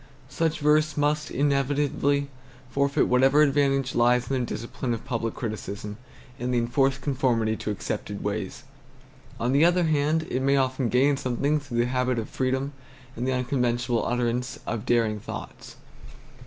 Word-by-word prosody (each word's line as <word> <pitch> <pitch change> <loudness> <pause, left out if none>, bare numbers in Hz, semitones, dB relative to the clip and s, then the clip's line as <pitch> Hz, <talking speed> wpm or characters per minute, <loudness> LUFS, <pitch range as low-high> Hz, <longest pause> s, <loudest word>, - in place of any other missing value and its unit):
Such 160 -1 -1
verse 155 +1 +3
must 150 +1 +1
inevitably 140 0 +1 0.4
forfeit 140 +1 +2
whatever 135 +4 +5
advantage 135 -2 +2
lies 120 +1 +2
in 135 - +1
the 125 - -1
discipline 120 +1 -3
of 115 - -10
public 115 -2 -2
criticism 105 -2 -5 0.4
and 125 +1 -2
the 125 - +1
enforced 135 +3 +1
conformity 125 -6 +1
to - - -4
accepted 105 - -4
ways. - - -3 0.8
On 120 +2 0
the 140 +3 +4
other 175 +1 +4
hand, 155 0 +1
it 130 - 0
may 140 +1 +3
often 130 -2 0
gain 135 +4 +3
something 140 +4 0
through 140 -5 -6
the 120 - +3
habit 125 0 0
of 115 - -3
freedom 130 +2 -1 0.4
and 120 +2 -3
the 130 - +1
unconventional 125 -2 0
utterance 125 +1 -1
of 115 -3 -4
daring 115 -3 +2
thoughts. - - -8
130 Hz, 155 wpm, -26 LUFS, 120-145 Hz, 0.8 s, whatever